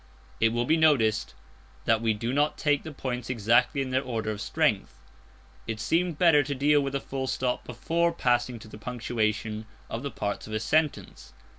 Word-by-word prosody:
It 115 Hz, -, +4 dB
will 120 Hz, +1 st, 0 dB
be 160 Hz, +5 st, +3 dB
noticed 115 Hz, -, +2 dB, 0.5 s
that 115 Hz, -1 st, +3 dB
we 110 Hz, -2 st, +1 dB
do 115 Hz, +4 st, -3 dB
not 145 Hz, +2 st, +1 dB
take 145 Hz, -2 st, +1 dB
the 160 Hz, -, -8 dB
points 125 Hz, -4 st, -4 dB
exactly 120 Hz, +4 st, +2 dB
in 130 Hz, -, -6 dB
their 130 Hz, +1 st, +2 dB
order 115 Hz, -4 st, -3 dB
of 105 Hz, -1 st, -5 dB
strength. -, -, 0 dB, 0.7 s
It 110 Hz, -1 st, -3 dB
seemed 170 Hz, +5 st, 0 dB
better 165 Hz, -4 st, +5 dB
to 140 Hz, 0 st, -3 dB
deal 145 Hz, +2 st, +3 dB
with 140 Hz, -1 st, -3 dB
the 140 Hz, -, 0 dB
full 135 Hz, -1 st, -4 dB
stop 125 Hz, -1 st, -1 dB
before 165 Hz, +8 st, 0 dB
passing 125 Hz, -5 st, 0 dB
to 110 Hz, -, -12 dB
the 110 Hz, -, -11 dB
punctuation 110 Hz, -2 st, -2 dB, 0.2 s
of 115 Hz, -, -3 dB
the 140 Hz, -, -3 dB
parts 105 Hz, -5 st, -4 dB
of 110 Hz, -, -7 dB
a 110 Hz, -, 0 dB
sentence. 145 Hz, -, -1 dB
125 Hz, 190 wpm, -27 LUFS, 110-145 Hz, 0.7 s, better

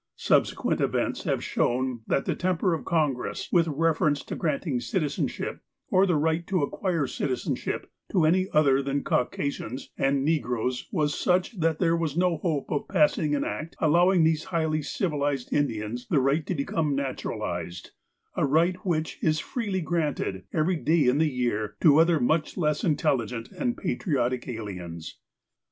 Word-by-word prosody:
Subsequent -, -, +1 dB
events -, -, -1 dB
have -, -, 0 dB
shown 125 Hz, -1 st, 0 dB
that 135 Hz, -, +1 dB
the -, -, 0 dB
temx)er 180 Hz, -1 st, +1 dB
of -, -, -6 dB
Con 155 Hz, -5 st, +2 dB
gress, 125 Hz, -, -5 dB
with 170 Hz, -2 st, +4 dB
reference 155 Hz, -1 st, +1 dB
to -, -, -6 dB
granting 150 Hz, -4 st, -1 dB
citizenship, 145 Hz, +5 st, -2 dB, 0.3 s
or 190 Hz, +1 st, +4 dB
the 180 Hz, -, +2 dB
right 160 Hz, +3 st, 0 dB
to 185 Hz, -6 st, +1 dB
acquire 170 Hz, 0 st, -1 dB
citizeushij) 130 Hz, 0 st, -2 dB, 0.3 s
to 175 Hz, -5 st, +3 dB
any 185 Hz, +4 st, +3 dB
other 140 Hz, -3 st, +4 dB
than 140 Hz, +1 st, -2 dB
Caucasians 130 Hz, -1 st, -2 dB
and 135 Hz, 0 st, +2 dB
negroes, 125 Hz, -5 st, -1 dB
was 150 Hz, -5 st, +1 dB
such, 185 Hz, +3 st, 0 dB
that 165 Hz, -1 st, +1 dB
there 165 Hz, -1 st, +2 dB
was 165 Hz, -2 st, -2 dB
no 180 Hz, -2 st, +2 dB
hope 155 Hz, -4 st, -2 dB
of 145 Hz, -, -1 dB
passing 155 Hz, -4 st, +2 dB
an 140 Hz, -, 0 dB
Act 160 Hz, +2 st, -5 dB
allowing 175 Hz, +3 st, +4 dB
these 160 Hz, 0 st, +2 dB
highly 160 Hz, -3 st, 0 dB
civilized 145 Hz, -6 st, -2 dB
Indians 120 Hz, -3 st, -1 dB
the 145 Hz, -, +3 dB
right 140 Hz, +4 st, +1 dB
to 185 Hz, -, -1 dB
become 145 Hz, 0 st, -1 dB
naturalized, 130 Hz, -9 st, -4 dB, 0.4 s
a -, -, 0 dB
right 165 Hz, +6 st, +3 dB
which 160 Hz, -4 st, -1 dB
is 155 Hz, -1 st, +2 dB
freely 205 Hz, -4 st, -2 dB
granted, 150 Hz, -, -2 dB
every 170 Hz, +3 st, +1 dB
day 160 Hz, 0 st, +2 dB
in 125 Hz, +4 st, +3 dB
the 160 Hz, -1 st, +3 dB
year, 115 Hz, -5 st, -2 dB
to 150 Hz, -1 st, +6 dB
other 165 Hz, -1 st, +4 dB
much 155 Hz, +5 st, 0 dB
less 150 Hz, -3 st, 0 dB
intelligent 125 Hz, -, 0 dB
and 245 Hz, -3 st, -2 dB
patriotic 125 Hz, -6 st, -1 dB
aliens. 90 Hz, -8 st, -7 dB
150 Hz, 160 wpm, -26 LUFS, 135-165 Hz, 0.4 s, to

